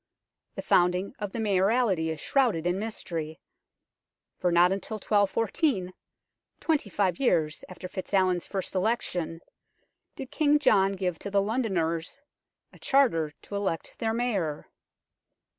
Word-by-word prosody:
The - - -5
founding 180 +2 +2
of 205 -2 -4
the 230 - -5
Mayoralty 200 -3 +2
is 160 -1 -4
shrouded 235 - +1
in 175 +2 0
mystery, 170 -7 -5 1.0
for 180 - +1
not 175 +1 +5
until 200 +3 -3
1214, 210 - +1 0.7
twenty 305 -10 0
five 190 -3 0
years 160 - +1
after 185 0 -8
FitzAlwin's 185 -1 0
first 195 -2 -4
election, 180 -5 -1 0.7
did 265 - -8
King 295 -1 +3
John 200 -9 +3
give 180 -3 -2
to - - -5
the 200 0 +2
Londoners 195 -5 -1 0.5
a - - -17
charter 195 - +2
to 205 - -7
elect 195 -5 -3
their 225 -1 0
Mayor. 205 -11 -2
195 Hz, 125 wpm, -27 LUFS, 175-225 Hz, 1.0 s, not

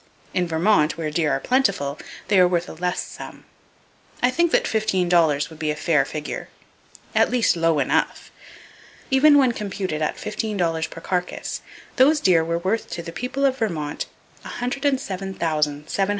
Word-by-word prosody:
In 180 -1 +1
Vermont, 165 -1 +2
where 155 -2 -3
deer 150 -1 +1
are 135 - +1
plentiful, 195 - 0 0.3
they 195 -1 +4
are 180 - +7
worth 175 -1 0
a - - -8
less 180 +2 -2
sum. - - -10 0.8
I 250 - +4
think 340 +4 +2
that - - +3
fifteen 210 -5 +1
dollars 165 -4 +3
would 160 - -12
be 155 - -1
a 150 - 0
fair 150 -2 +2
figure,—at 150 +1 -4
least 245 -6 +2
low 165 -2 +2
enough! 140 - 0 0.8
Even 290 +2 +6
when 265 -3 +4
computed 195 -7 -4
at 155 - -1
fifteen 210 0 -3
dollars 165 -3 0
per 165 - -10
carcass, 180 0 -3 0.4
those 290 +4 +5
deer 175 - +4
were 170 +1 -1
worth 190 +6 -1
to 170 - -5
the 165 - -7
people 260 +8 -2
of 265 -1 +1
Vermont 160 -10 -2 0.4
$107,790. 195 - -1
180 Hz, 160 wpm, -23 LUFS, 160-225 Hz, 0.8 s, are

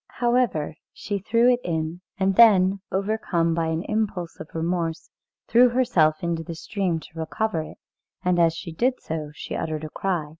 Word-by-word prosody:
However, 240 -10 +1 0.2
she 205 -1 -4
threw 230 +5 +2
it 245 - 0
in, 160 +1 -3 0.2
and 190 0 +1
then, 195 -4 +6
overcome 190 -4 0
by 165 0 0
an 160 +1 -1
impulse 205 -6 -2
of - - -8
remorse, 165 0 -2 0.4
threw 245 +2 +6
herself 185 -12 +2
into 170 -1 -1
the 165 +1 -7
stream 180 -1 -2
to 160 +1 -12
recover 180 +2 -1
it, 155 - -10 0.5
and 180 -1 +2
as 165 -1 +4
she 170 0 -7
did 250 +10 0
so 155 -2 -5
she - - -6
uttered 155 -1 -3
a 155 - -6
cry. 175 -6 -2
175 Hz, 175 wpm, -24 LUFS, 160-215 Hz, 0.5 s, then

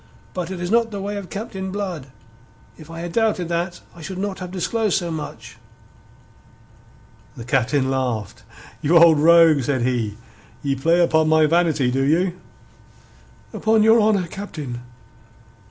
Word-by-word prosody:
But 180 -2 -4
it 190 -2 -6
is 175 +2 -4
not 230 0 +3
the 205 -2 -6
way 200 +1 -4
of 195 -3 -7
Captain 190 -2 -6
Blood. 185 -8 -5 0.7
If 155 -1 -14
I 165 0 -7
had 175 0 -5
doubted 210 -5 0
that 175 +1 -3
I 170 - -13
should 185 +4 -7
not 195 0 -4
have 180 -1 -6
disclosed 205 +3 -1
so 175 -3 -3
much." 155 -2 -7 1.8
The 115 - -7
Captain 130 +2 +1
laughed. 125 -5 -3 0.4
"You 165 +4 +4
old 165 -2 +6
rogue," 165 -2 +6
said 130 -1 -1
he. 115 -5 -1 0.5
"Ye 140 -1 0
play 165 +6 +2
upon 160 -2 +3
my 160 0 +4
vanity, 155 -5 +2
do 135 +2 0
you?" 175 +6 +1 1.1
"Upon 220 0 +2
your 225 +1 +5
honour, 210 -4 +2
Captain." 150 -10 -7
170 Hz, 155 wpm, -21 LUFS, 145-190 Hz, 1.8 s, old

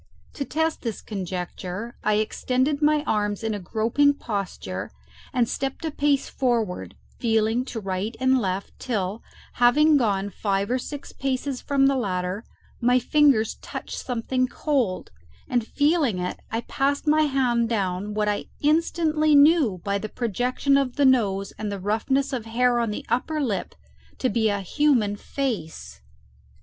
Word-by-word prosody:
To 280 - -3
test 320 +3 -1
this 230 -4 -3
conjecture 185 +2 -5
I 215 - +2
extended 255 +6 0
my 300 0 +3
arms 210 -5 -1
in 220 -1 -1
a 205 - -3
groping 230 +9 +2
posture 180 - -4 0.4
and 240 -2 +2
stepped 270 +6 -3
a 320 - -1
pace 290 -1 +1
forward, 220 - -1 0.2
feeling 225 +1 +2
to 240 - -5
right 195 +2 -3
and 260 0 +3
left, 190 -2 -3
till, 210 -3 -2 0.4
having 300 +5 +6
gone 205 -5 0
five 200 +2 -1
or 255 - +1
six 285 +3 -7
paces 265 0 -2
from 275 -1 +2
the 275 0 +4
ladder, 185 -3 -2 0.4
my 245 +1 +4
fingers 255 -3 +3
touched - - -6
something 255 +1 -1
cold, 255 -9 -1 0.4
and 240 -4 0
feeling 290 - +2
it, 180 0 -3
I 225 - -2
passed 280 +4 -1
my 310 0 +4
hand 245 -4 +1
down 200 -1 -1
what 210 0 +1
I 205 0 -1
instantly 310 0 +2
knew 285 - +5
by 200 0 0
the 215 - -5
projection 250 +5 +1
of 270 -3 0
the 285 - +3
nose 200 -7 +2
and 210 -1 -3
the 200 - -4
roughness 265 +8 0
of 240 -4 -3
hair 240 +1 +2
on 230 -2 0
the 210 - -5
upper 305 +5 -1
lip 240 -9 -2 0.4
to 255 - 0
be 225 -3 +2
a 200 -1 -1
human 235 - +2
face! 175 - -4
240 Hz, 155 wpm, -24 LUFS, 205-275 Hz, 0.4 s, having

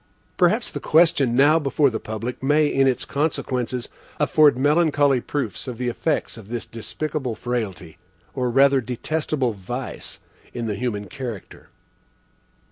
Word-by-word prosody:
Perhaps 195 +6 +2
the - - -4
question 155 -7 +3
now 145 +5 +5
before 140 -1 +2
the 110 - -3
public 110 +3 -5
may, 150 +3 +3
in 135 -2 +2
its 130 -2 0
consequences, 130 -5 -2 0.3
afford 150 -4 +4
melancholy 145 -2 +3
proofs 120 - -4
of 125 -2 -5
the 125 0 -1
effects 150 +1 -2
of 110 -3 -11
this 120 -1 -4
despicable 130 +2 -4
frailty, 105 -8 -4 0.3
or 125 0 -1
rather 135 +2 +4
detestable 130 +1 -2
vice, 120 +7 -6 0.4
in 120 -1 -3
the 110 - -1
human 105 -2 -3
character. 115 0 -8
130 Hz, 135 wpm, -23 LUFS, 115-145 Hz, 0.4 s, now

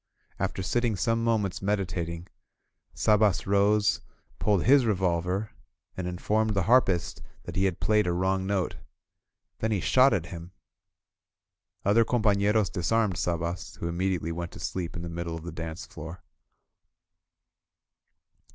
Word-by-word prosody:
After 95 - -2
sitting 120 +2 0
some 115 +5 0
moments 110 -5 0
meditating, 90 -4 -2 0.7
Sabas 105 -3 +3
rose, 100 - +3 0.4
pulled 105 -4 +2
his 135 +2 +6
re 110 -3 +2
volver, 90 +3 -1 0.5
and 90 -1 -4
informed 105 +4 0
the 100 - +2
harpist 100 -5 +2 0.2
that - - -8
he 95 - +2
had 95 -3 -1
played 105 -2 +2
a - - +2
wrong 95 +2 0
note. 95 -3 -1 0.8
Then 110 - 0
he 105 - +1
shot 130 - +5
at 95 -5 0
him. 85 +2 -9 1.3
Other 105 +4 +5
coni" 120 0 0
pafieros 105 -1 +2
disarmed 100 +1 0
Sabas, 85 0 -2
who 85 - -4
immediately 85 -1 -1
went 85 +1 -4
to - - -10
sleep 90 -3 -4
in 85 - -5
the - - -4
middle 85 0 -4
of 80 - -8
the 85 - -6
dance 80 +3 -6
floor. 80 +3 -9
95 Hz, 140 wpm, -27 LUFS, 85-105 Hz, 1.3 s, his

